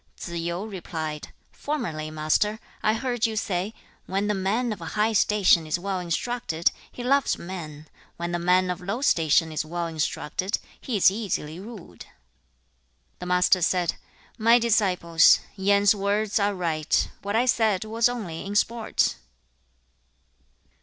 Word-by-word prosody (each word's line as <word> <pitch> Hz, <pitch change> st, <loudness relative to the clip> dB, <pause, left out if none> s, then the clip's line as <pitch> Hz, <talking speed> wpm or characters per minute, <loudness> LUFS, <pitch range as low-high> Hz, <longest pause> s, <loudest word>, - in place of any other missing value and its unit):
3. 170 Hz, -, -7 dB
Tsze 165 Hz, -, -4 dB
yu 175 Hz, +4 st, -3 dB
replied, 160 Hz, -6 st, -6 dB, 0.2 s
'Formerly, 170 Hz, -, -4 dB
Master, 155 Hz, +8 st, 0 dB, 0.2 s
I 215 Hz, +1 st, +2 dB
heard 245 Hz, -1 st, 0 dB
you 220 Hz, -, -4 dB
say, 195 Hz, -1 st, -1 dB, 0.4 s
"When 195 Hz, +2 st, -1 dB
the 210 Hz, -, +1 dB
man 215 Hz, +5 st, 0 dB
of 210 Hz, -, -10 dB
high 210 Hz, +7 st, 0 dB
station 195 Hz, -6 st, +4 dB
is 155 Hz, -, 0 dB
well 190 Hz, +1 st, -3 dB
instructed, 175 Hz, -1 st, -1 dB, 0.2 s
he 245 Hz, -, -8 dB
loves 275 Hz, +2 st, +2 dB
men; 155 Hz, -4 st, -8 dB, 0.3 s
when 170 Hz, 0 st, -3 dB
the 175 Hz, -, -1 dB
man 180 Hz, +1 st, +3 dB
of 180 Hz, -, -5 dB
low 200 Hz, +9 st, -3 dB
station 160 Hz, -, +3 dB
is 155 Hz, -, -2 dB
well 170 Hz, +2 st, -3 dB
instructed, 165 Hz, +4 st, -2 dB, 0.2 s
he 240 Hz, -5 st, -2 dB
is 190 Hz, -, +6 dB
easily 180 Hz, -6 st, -3 dB
ruled."' 195 Hz, -, -11 dB
4. -, -, -24 dB, 1.1 s
The 180 Hz, -, -6 dB
Master 180 Hz, +1 st, +3 dB
said, 175 Hz, 0 st, +1 dB, 0.5 s
'My 230 Hz, +2 st, +6 dB
disciples, 190 Hz, -8 st, +4 dB, 0.2 s
Yen's 200 Hz, +1 st, +4 dB
words 205 Hz, +1 st, 0 dB
are 200 Hz, 0 st, +1 dB
right. 160 Hz, -4 st, 0 dB
What 200 Hz, +1 st, -3 dB
I 235 Hz, +2 st, +3 dB
said 220 Hz, -5 st, +2 dB
was 225 Hz, +2 st, +2 dB
only 200 Hz, -10 st, -5 dB
in 200 Hz, +1 st, -5 dB
sport.' 230 Hz, +1 st, +1 dB
190 Hz, 150 wpm, -25 LUFS, 170-220 Hz, 1.1 s, is